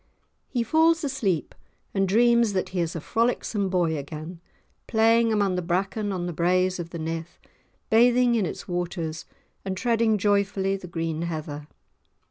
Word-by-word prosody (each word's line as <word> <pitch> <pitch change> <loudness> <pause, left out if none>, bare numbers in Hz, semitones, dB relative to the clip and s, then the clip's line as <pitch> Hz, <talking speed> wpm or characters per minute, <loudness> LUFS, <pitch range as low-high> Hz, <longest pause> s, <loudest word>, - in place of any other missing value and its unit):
He 245 -3 -1
falls 320 +6 +3
asleep 225 - -1 0.4
and 195 -1 +1
dreams 235 +1 +4
that 185 - -1
he 185 - -3
is 170 -1 -1
a - - -2
frolicsome 225 0 0
boy 175 -3 +1
again, 155 +4 -8 0.5
playing 230 0 +3
amongst 200 -4 +1
the - - 0
bracken 195 +4 -1
on 180 -2 -3
the 175 - -3
braes 185 +2 +1
of 170 -1 -5
the 170 - -7
Nith, 165 +1 -5 0.5
bathing 240 +2 +5
in 215 -6 +1
its - - -7
waters 175 -2 -3 0.4
and 190 -1 -4
treading 230 -1 +2
joyfully 200 -1 +1
the 190 -2 -8
green 165 -2 -3
heather. 155 -3 -5
190 Hz, 155 wpm, -25 LUFS, 170-225 Hz, 0.5 s, bathing